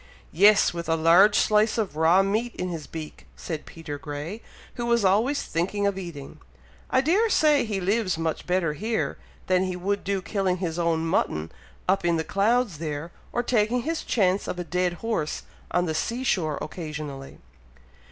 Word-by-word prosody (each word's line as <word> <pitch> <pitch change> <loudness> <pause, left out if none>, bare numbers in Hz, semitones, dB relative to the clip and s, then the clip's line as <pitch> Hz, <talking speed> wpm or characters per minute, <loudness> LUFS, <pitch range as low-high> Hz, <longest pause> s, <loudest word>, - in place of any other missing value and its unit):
"Yes! 200 +4 +5
with 170 -1 -5
a 165 - +3
large 175 +6 +6
slice 215 +1 +3
of 210 -9 -1
raw 165 +5 +4
meat 220 +5 -1
in 180 - -3
his 165 -4 -6
beak!" 155 -2 -8
said 160 -3 -6
Peter 150 -3 -7
Grey, 150 +9 -6 0.3
who 240 -1 -4
was 235 -3 +2
always 225 +10 +2
thinking 195 +5 -1
of 200 -1 +1
eating. 170 -7 -8 0.5
"I - - +3
dare 385 +11 +2
say 300 - +4
he 210 -3 -2
lives 190 -1 0
much 165 -1 -3
better 180 -4 +1
here, 220 +8 -2 0.3
than 185 0 +2
he 185 -1 -3
would 200 +3 -2
do 195 -1 -1
killing 190 0 0
his 175 -2 -3
own 165 -1 +1
mutton 80 - 0 0.4
up 190 +1 +2
in 170 -1 +2
the 160 - -1
clouds 210 -1 +1
there, 155 +1 -4 0.2
or 240 - -1
taking 235 +1 +1
his 325 +2 -2
chance 195 -3 +1
of - - -3
a 180 - -3
dead 180 0 0
horse 190 -10 -2 0.3
on 180 0 +1
the 160 - -1
sea 235 +10 -2
shore 160 - 0
occasionally." 150 -5 -7
185 Hz, 180 wpm, -25 LUFS, 165-215 Hz, 0.5 s, large